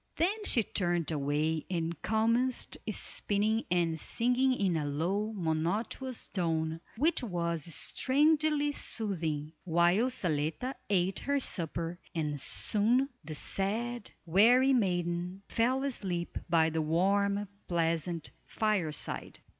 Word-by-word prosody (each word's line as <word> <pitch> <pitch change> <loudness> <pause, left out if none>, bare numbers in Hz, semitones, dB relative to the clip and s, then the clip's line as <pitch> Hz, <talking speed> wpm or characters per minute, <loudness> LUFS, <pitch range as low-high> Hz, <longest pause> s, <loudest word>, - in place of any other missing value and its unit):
Then 410 +6 0
she 230 - +3
turned 175 -5 0
away 150 +2 0
and 170 -3 -3
commenced 230 +3 +2
spinning 215 +2 +2
and 170 -2 +1
singing 250 - +2
in 190 -7 +1
a 155 - 0
low, 175 +9 -1
monotonous 200 +8 -2
tone, 160 -3 -1 0.2
which 310 +6 +2
was 170 - -2
strangely 295 - +2
soothing, 165 - -2
while 175 +7 +3
Zaletta 165 - -1 0.2
ate 190 -1 +1
her 280 0 0
supper, 170 - -2 0.2
and 150 -3 -2
soon 235 - +2
the 155 +1 -7
sad, 220 +8 -2 0.2
weary 240 +10 +5
maiden 180 -3 -1
fell 255 +4 +1
asleep 190 -10 -3
by 160 -1 +3
the 160 0 0
warm, 200 +5 +1 0.2
pleasant 165 -1 -1 0.2
fireside. 195 -9 -1
185 Hz, 110 wpm, -31 LUFS, 165-235 Hz, 0.2 s, weary